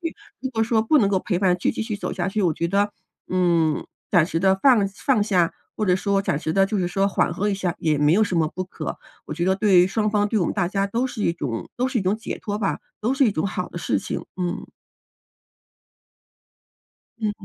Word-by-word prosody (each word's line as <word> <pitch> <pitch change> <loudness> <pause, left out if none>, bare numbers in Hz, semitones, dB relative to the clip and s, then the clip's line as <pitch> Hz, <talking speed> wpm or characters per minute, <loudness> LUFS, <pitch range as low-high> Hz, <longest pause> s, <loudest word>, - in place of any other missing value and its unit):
去。 330 -3 -4 0.2
如 260 - -2
果 225 -3 0
说 220 -1 +2
不 300 +7 +3
能 200 - +3
够 190 - +2
陪 180 -4 -1
伴 180 -2 +3
去 - - +1
继 - - -3
续 220 -2 -3
走 - - -4
下 175 -2 -2
去， 210 +2 -1
我 175 -4 +3
觉 170 - -1
得， 200 +2 +1 0.4
嗯， 170 -4 +2 0.3
暂 175 -5 +5
时 165 -1 -2
地 190 +1 +4
放 240 -8 +5
放 210 +3 +1
下， 180 -6 +2 0.2
或 215 - 0
者 180 -2 +3
说 195 +1 +1
暂 150 - 0
时 155 - -2
地 195 - +5
就 200 +1 -1
是 180 -2 0
说 195 +2 +1
缓 175 - +1
和 205 +3 0
一 - - 0
下， 185 -3 -2
也 155 -2 +1
没 150 +2 +4
有 215 +3 +4
什 185 - -3
么 160 -2 +2
不 185 - -3
可， 165 -3 -6 0.3
我 150 - -5
觉 175 +2 -1
得 190 - +3
对 190 -4 +5
双 215 +2 0
方、 205 -1 +2
对 220 - +1
我 180 - +1
们 - - -2
大 185 -4 0
家 195 0 0
都 235 +6 -1
是 230 -4 -5
一 170 - +2
种 130 -8 -4
都 250 +1 +1
是 255 -2 -1
一 - - -1
种 190 +3 +1
解 225 - -6
脱 205 -1 -3
吧、 195 - -1 0.2
都 235 +5 +1
是 270 -1 +3
一 220 - +3
种 160 +3 -1
好 180 -1 -3
的 - - -12
事 - - 0
情， - - -5 0.2
嗯。 175 -1 -2 2.5
嗯。 210 -2 -3
195 Hz, 265 characters per minute, -23 LUFS, 175-215 Hz, 2.5 s, 暂